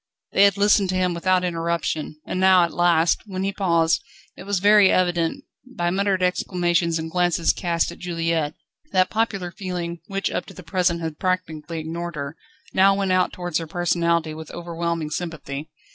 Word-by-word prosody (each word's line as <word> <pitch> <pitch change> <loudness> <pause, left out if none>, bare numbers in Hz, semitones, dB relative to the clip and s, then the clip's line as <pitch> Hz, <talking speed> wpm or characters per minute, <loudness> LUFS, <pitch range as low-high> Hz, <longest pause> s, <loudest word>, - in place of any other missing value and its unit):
They 200 - +6
had 200 -1 +3
listened 200 -1 +3
to 185 - 0
him 185 -1 +1
without 180 +2 +1
interruption, 165 -3 -2
and 185 - -3
now 190 -1 +6
at 170 - -1
last, 170 -1 +3
when 190 -1 -4
he 195 +1 -1
paused, 170 -5 +2 0.3
it 185 - -11
was 200 0 0
very 205 +1 +6
evident, 175 +7 +1 0.3
by 175 0 0
muttered 195 0 +1
exclamations 175 -2 +1
and 160 0 -5
glances 175 -1 +2
cast 170 -2 -1
at 170 - -12
Juliette, 165 -3 -1 0.4
that 185 -1 +3
popular 215 -5 -1
feeling, 175 -3 -5
which 195 -1 -2
up - - -3
to - - -12
the 185 - -10
present 170 0 0
had 160 -2 -5
practically 170 -3 -2
ignored 170 +2 -5
her, 140 +1 -5 0.4
now 195 +1 +5
went 195 -1 0
out 185 0 +2
towards 175 -2 -2
her 165 - -6
personality 170 -1 0
with 160 0 -9
overwhelming 170 -2 -3
sympathy. 155 -4 -5
175 Hz, 175 wpm, -23 LUFS, 165-185 Hz, 0.4 s, They